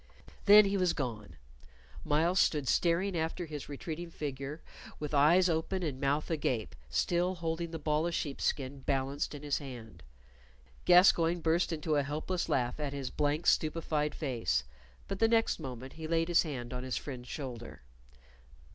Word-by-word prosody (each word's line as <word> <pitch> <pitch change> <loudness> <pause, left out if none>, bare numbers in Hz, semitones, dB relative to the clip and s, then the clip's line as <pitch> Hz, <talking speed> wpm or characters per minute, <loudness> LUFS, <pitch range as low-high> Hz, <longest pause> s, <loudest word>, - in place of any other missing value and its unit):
Then 210 +1 +9
he 200 0 0
was 180 -2 +2
gone. 115 -7 -5 0.7
Myles 165 +5 +2
stood 150 -4 +2
staring 175 +6 +2
after 165 +2 -2
his 150 -3 -7
retreating 160 +4 -6
figure 145 -1 -5 0.4
with 150 0 -5
eyes 160 +6 +5
open 175 +3 -1
and 140 -4 -3
mouth 145 +4 0
agape, 130 -8 -1
still 175 - +1
holding 170 0 -3
the 165 - -5
ball 155 +1 0
of 170 - -2
sheepskin 140 -1 -2
balanced 135 +2 -2
in 145 - -9
his 145 -1 0
hand. 115 - -10 0.8
Gascoyne 175 -1 +5
burst 165 +2 +1
into 155 -1 0
a - - +3
helpless 155 +6 -3
laugh 125 +1 0
at 145 -2 -3
his 140 -2 -4
blank, 150 +3 0
stupefied 155 -1 +1
face, 115 - -1 0.4
but 195 - -4
the 225 - +5
next 225 -4 +2
moment 130 -3 -7
he 160 -1 -6
laid 165 +1 +1
his 170 - +5
hand 130 -6 -5
on 125 - -4
his 130 -1 -3
friend's 125 -3 -7
shoulder. 120 - -7
150 Hz, 160 wpm, -31 LUFS, 135-170 Hz, 0.8 s, Then